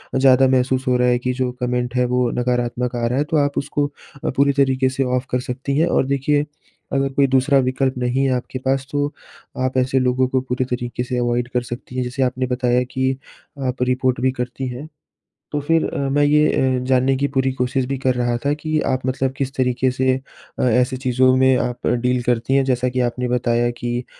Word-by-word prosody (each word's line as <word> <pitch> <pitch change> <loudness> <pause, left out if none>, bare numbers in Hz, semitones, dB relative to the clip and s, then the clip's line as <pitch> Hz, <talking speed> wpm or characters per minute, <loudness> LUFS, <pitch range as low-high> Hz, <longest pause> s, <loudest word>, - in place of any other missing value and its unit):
ज़्यादा 135 0 +5
महसूस 130 0 +1
हो 125 -1 +3
रहा 125 - +2
है 125 0 +2
कि 125 +1 -1
जो 130 -1 -1
कमेंट 125 0 -1
है 125 - +2
वो 125 0 +1
नकारात्मक 125 0 -1
आ 120 - -1
रहा 125 +2 -1
है 145 - +3
तो 160 - +3
आप 145 -1 +1
उसको 145 +1 -1 0.3
अ, - - 0
पूरी 140 +1 +2
तरीके 130 -1 +2
से 135 +1 -1
ऑफ 125 0 -1
कर 125 - +1
सकती 130 +3 -3
हैं 165 +3 +3
और 155 - +2
देखिए, 145 +2 +1 0.5
अगर 135 0 +1
कोई 140 0 +3
दूसरा 135 +2 +3
विकल्प 130 +1 0
नहीं 125 +2 0
है - - +2
आपके 125 +1 -4
पास 135 0 +1
तो 145 0 -1 0.5
आप 130 0 -1
ऐसे 130 +1 +2
लोगों 130 0 +2
को 130 0 0
पूरे 130 0 -2
तरीके 125 -1 -3
से 125 0 -3
अवॉइड 120 0 0
कर 125 - +1
सकती 120 +1 -8
हैं 130 - 0
जैसे 130 +2 -2
आपने 130 0 -1
बताया 125 0 +1
कि 130 0 0 0.5
आप 125 0 -3
रिपोर्ट 125 0 0
भी 130 - +2
करती 130 +1 -4
हैं। 125 +5 -7 0.7
तो 145 - 0
फ़िर 165 +3 +1
अ, - - -4
मैं 145 +2 +2
ये 150 +1 +4
ए, 130 -1 +1
जानने 130 +1 +2
की 140 +2 0
पूरी 135 -1 0
कोशिश 125 0 -1
भी 135 +1 -2
कर 130 -1 +1
रहा 120 -1 0
था 145 - +3
कि 155 +1 -2
आप 130 -1 -1
मतलब 130 0 -1
किस 135 -1 -3
तरीके 130 0 +1
से 130 0 +1 0.4
अ, - - -1
ऐसी 125 +2 +2
चीज़ों 130 0 +2
में 130 0 +4
आप 125 -1 -3
डील 125 +1 +1
करती 120 +2 0
हैं 135 0 +3
जैसा 125 -1 +1
कि 125 0 -2
आपने 125 +1 -1
बताया 120 -1 +1
कि 120 +1 -2
130 Hz, 220 wpm, -20 LUFS, 125-135 Hz, 0.7 s, ज़्यादा